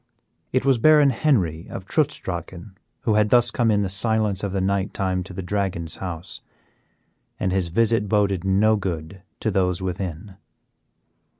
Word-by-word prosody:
It 130 +1 0
was 135 -3 +3
Baron 150 +1 +6
Henry 95 - 0
of 95 - -7
Trutz 145 +6 0
Drachen 90 +2 -7 0.3
who 110 - +1
had 105 0 +3
thus 120 0 +4
come 120 -1 +1
in 105 -1 +2
the - - -1
silence 105 0 0
of 100 - -2
the 95 - -1
night 95 0 -1
time 95 -1 -1
to 95 - -10
the 95 +1 -6
Dragon's 90 -4 -2
house, 90 -1 -6 1.0
and 95 - 0
his 95 -2 +1
visit 110 +3 +1
boded 100 -4 +1
no 105 +3 +3
good 90 -1 -5 0.2
to 110 - 0
those 90 -2 +1
within. 95 0 -5
95 Hz, 165 wpm, -23 LUFS, 90-110 Hz, 1.0 s, Baron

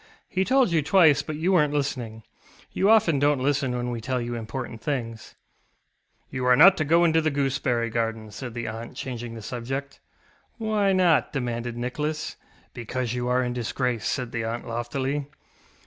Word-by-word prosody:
ŌĆ£He 190 +1 +1
told 260 -6 +3
you 165 -2 +3
twice, 155 -3 +5
but 155 - -5
you 165 +5 0
werenŌĆÖt 150 -5 +3
listening. 125 -6 -3 0.5
You 195 - +2
often 170 -10 +4
donŌĆÖt 145 -1 +3
listen 135 -2 0
when 120 0 -2
we 120 -1 -4
tell 130 +2 -1
you 120 0 -4
important 115 0 -6
things. 115 -5 -4 1.0
ŌĆØ - - -7
ŌĆ£You 125 - -1
are 125 0 +6
not 185 +8 +8
to 155 - 0
go 165 +4 +4
into 160 -1 +4
the 155 - +1
gooseberry 130 -5 0
garden, 115 -1 -2
ŌĆØ - - -14
said 120 +3 -7
the 120 -1 -4
aunt, 115 +2 -7
changing 120 -2 -5
the 110 - -8
subject. 135 +5 -5 0.6
ŌĆ£Why 210 -3 +1
not? 175 -4 +4
ŌĆØ - - -29
demanded 120 -3 -3
Nicholas. 150 +5 -3 0.4
ŌĆ£Because 120 0 -3
you 125 0 -2
are 125 +1 +2
in 125 0 -2
disgrace, 125 0 -2
ŌĆØ - - +1
said 125 -4 -4
the 120 -1 -2
aunt 115 +2 -4
loftily. 130 +5 -2
130 Hz, 190 wpm, -25 LUFS, 120-150 Hz, 1.0 s, not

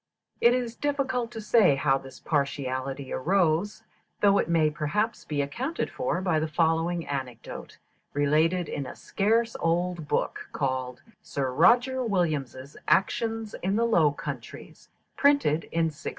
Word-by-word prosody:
It 240 +1 +6
is 240 -2 -3
difficult 265 -4 -1
to 230 - -8
say 215 -8 +4
how 135 -1 +2
this 135 -1 -12
partiality 135 -2 -2
arose, 180 +4 +1 0.4
though 200 -1 +5
it - - -1
may 160 -2 +3
perhaps 210 +10 -2
be 145 -2 -1
accounted 255 - -3
for 220 -8 -2
by 175 -4 +1
the 155 - -1
following 165 +2 +1
anecdote, 130 -4 -6 0.4
related 155 +5 +2
in 140 -3 -4
a - - -8
scarce 225 +3 0
old 170 -1 -1
book, - - -2
called 130 -2 -2 0.2
"Sir 135 -2 -3
Roger 245 - +4
Williams' 150 - -2
Actions 225 +3 +1
in 190 +2 0
the 230 +2 +2
Low 170 -10 +4
Countries," 145 - -8 0.3
printed 280 - +3
in 165 0 -1
1618. 145 - -6
165 Hz, 140 wpm, -27 LUFS, 145-225 Hz, 0.4 s, It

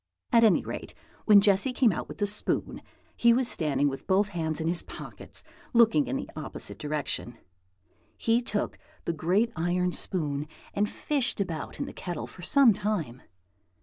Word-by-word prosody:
At 230 -1 +6
any 215 -5 +4
rate, - - -6 0.3
when 205 -2 +8
Jessy 200 +6 +4
came 250 -3 +4
out 170 - -4
with - - -9
the 205 - +1
spoon, 205 +1 -1 0.3
he 235 0 +5
was 250 +1 +1
standing 145 - +1
with 135 -1 -5
both 200 +2 +3
hands 160 -4 -2
in 160 - -2
his 170 +1 +1
pockets, - - -8 0.3
looking 235 +4 +5
in - - -2
the 275 - -3
opposite 155 -3 -3
direction. 145 -5 -3 0.8
He 230 +1 +2
took 210 -3 -2 0.3
the 170 - 0
great 185 +9 +1
iron 180 +2 0
spoon 150 -6 -2 0.3
and 210 +1 +1
fished 275 -7 -1
about 170 -6 -4
in - - -1
the - - -8
kettle 175 -4 -5
for - - -13
some 250 +5 +6
time. 180 - -3
190 Hz, 170 wpm, -28 LUFS, 160-225 Hz, 0.8 s, when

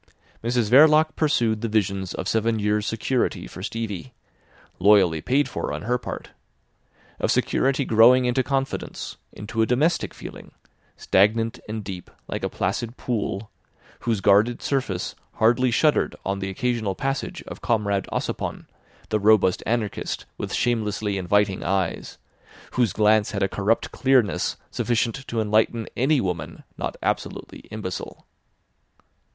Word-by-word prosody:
Mrs 120 -2 0
Verloc 155 +3 +6
pursued 115 -8 +1
the 115 - -1
visions 100 -3 -1
of 95 - -4
seven 110 +1 +1
years' 105 0 0
security 120 +3 -1
for - - -10
Stevie, 115 +2 -5 0.6
loyally 95 -5 +5
paid 140 - +2
for - - -4
on - - -4
her 125 +3 0
part; - - -7 0.9
of - - 0
security 135 +1 +1
growing 120 +3 +6
into 125 +1 +2
confidence, 135 0 -3
into 110 +2 -3
a 110 - +3
domestic 150 +8 +1
feeling, - - -10 0.4
stagnant 110 +4 +2
and 110 0 -4
deep 95 -3 -7 0.2
like - - -4
a - - 0
placid 115 +6 -2
pool, 110 -3 -3 0.5
whose 115 -4 -1
guarded 105 +5 +3
surface 130 -10 -1 0.2
hardly 120 +3 +3
shuddered 150 +6 +2
on 95 0 -1
the 95 0 -3
occasional 115 -2 -1
passage 135 +4 -3
of - - -9
Comrade 100 -4 0
Ossipon, - - -3 0.4
the 110 - +1
robust 105 -3 +4
anarchist 110 -3 -2
with - - -5
shamelessly 110 -3 0
inviting 100 +1 +1
eyes, 95 -3 -2 0.5
whose 120 -5 +2
glance 105 +1 +3
had 100 -1 0
a - - +3
corrupt 105 +3 0
clearness 130 -7 +2
sufficient 120 +2 -1
to 115 - -2
enlighten 110 +1 +1
any 135 +4 +3
woman 85 -6 -4
not - - -4
absolutely - - -3
imbecile. 105 -4 -6
110 Hz, 135 wpm, -24 LUFS, 100-125 Hz, 0.9 s, Verloc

